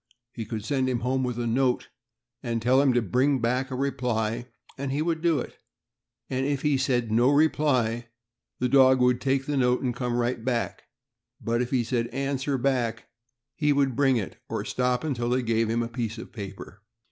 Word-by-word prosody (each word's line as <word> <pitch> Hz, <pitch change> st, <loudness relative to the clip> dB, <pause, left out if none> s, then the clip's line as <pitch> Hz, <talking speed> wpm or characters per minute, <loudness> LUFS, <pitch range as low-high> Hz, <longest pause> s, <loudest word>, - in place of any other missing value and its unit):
He 115 Hz, -3 st, -6 dB
could 110 Hz, -1 st, -5 dB
send 130 Hz, -1 st, 0 dB
him 120 Hz, -2 st, -1 dB
home 130 Hz, +2 st, 0 dB
with 125 Hz, -2 st, -2 dB
a 120 Hz, -, -2 dB
note 125 Hz, +2 st, +1 dB, 0.5 s
and 115 Hz, -2 st, -2 dB
tell 125 Hz, +4 st, +4 dB
him 140 Hz, -2 st, +4 dB
to 120 Hz, -1 st, +2 dB
bring 130 Hz, +7 st, +2 dB
a 125 Hz, +3 st, +1 dB
reply 125 Hz, -5 st, -1 dB
back, 120 Hz, +1 st, -8 dB, 0.3 s
and 135 Hz, 0 st, -4 dB
he 140 Hz, -, -1 dB
would 165 Hz, -1 st, -1 dB
do 165 Hz, -2 st, +3 dB
it; 125 Hz, -, -6 dB, 0.7 s
and 130 Hz, 0 st, -1 dB
if 140 Hz, 0 st, -1 dB
he 150 Hz, -2 st, +3 dB
said 125 Hz, -4 st, 0 dB
"No 120 Hz, +4 st, +4 dB
reply," 140 Hz, -6 st, +2 dB, 0.5 s
dog 130 Hz, +1 st, +5 dB
would 125 Hz, 0 st, +3 dB
take 135 Hz, 0 st, 0 dB
note 125 Hz, -3 st, +1 dB
and 125 Hz, -2 st, -1 dB
come 125 Hz, -1 st, -2 dB
right 120 Hz, -1 st, -1 dB
back; 120 Hz, -2 st, -2 dB, 0.5 s
but 115 Hz, +1 st, 0 dB
if 125 Hz, -, -2 dB
he 125 Hz, -2 st, +1 dB
said 115 Hz, 0 st, -1 dB
"Answer 135 Hz, +2 st, -2 dB
back," 120 Hz, -3 st, -1 dB, 0.4 s
he 150 Hz, -3 st, +1 dB
would 140 Hz, -3 st, +2 dB
bring 135 Hz, -1 st, +3 dB
it, 95 Hz, -8 st, -5 dB
or -, -, -3 dB
stop 125 Hz, -1 st, 0 dB
until 120 Hz, -6 st, -1 dB
they 125 Hz, +1 st, +1 dB
gave 115 Hz, -1 st, +1 dB
him 115 Hz, +1 st, +1 dB
a -, -, -3 dB
piece 115 Hz, -1 st, -4 dB
of 115 Hz, -, -9 dB
paper. 100 Hz, -2 st, -9 dB
125 Hz, 195 wpm, -26 LUFS, 120-135 Hz, 0.7 s, dog